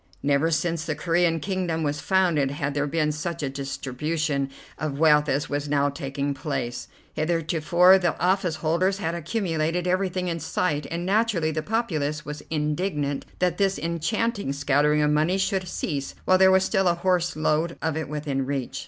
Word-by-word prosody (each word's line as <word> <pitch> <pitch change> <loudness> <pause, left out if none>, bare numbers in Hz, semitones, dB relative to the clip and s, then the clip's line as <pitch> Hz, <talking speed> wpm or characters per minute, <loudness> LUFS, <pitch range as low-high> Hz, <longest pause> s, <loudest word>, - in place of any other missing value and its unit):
Never 140 +3 +2
since 165 0 0
the 155 -2 -2
Corean 165 +1 +1
kingdom 175 -2 -2
was 145 0 -1
founded 175 -8 +2
had 140 0 -3
there 145 0 0
been 150 +1 +1
such 160 +2 -4
a 140 - -1
distribution 140 +2 -2 0.3
of 150 -3 -3
wealth 150 -1 +4
as 140 +2 0
was 145 0 -3
now 145 0 +2
taking 140 0 -3
place. 135 -4 -4 0.3
Heretofore 170 +3 +3
the 175 -3 -1
office 180 -2 +1
holders 170 +5 +1
had 165 -4 -2
accumulated 170 -1 -1
everything 185 0 0
in 170 -1 -2
sight, 150 -2 -1
and 170 +1 -3
naturally 195 -5 +1
the 155 0 -2
populace 155 -8 -2
was 150 0 -6
indignant 150 -2 -1
that 180 0 0
this 195 -1 +2
enchanting 170 - -1
scattering 145 +2 +2
of 150 - +2
money 155 +5 +2
should 190 -1 0
cease 140 -5 -3
while 185 0 +4
there 190 0 +7
was 190 0 +5
still 190 -1 +1
a 175 - +3
horseload 170 -2 0
of 160 -2 -1
it 160 -2 -3
within 145 -2 -2
reach. 135 0 -3
160 Hz, 170 wpm, -25 LUFS, 145-180 Hz, 0.3 s, there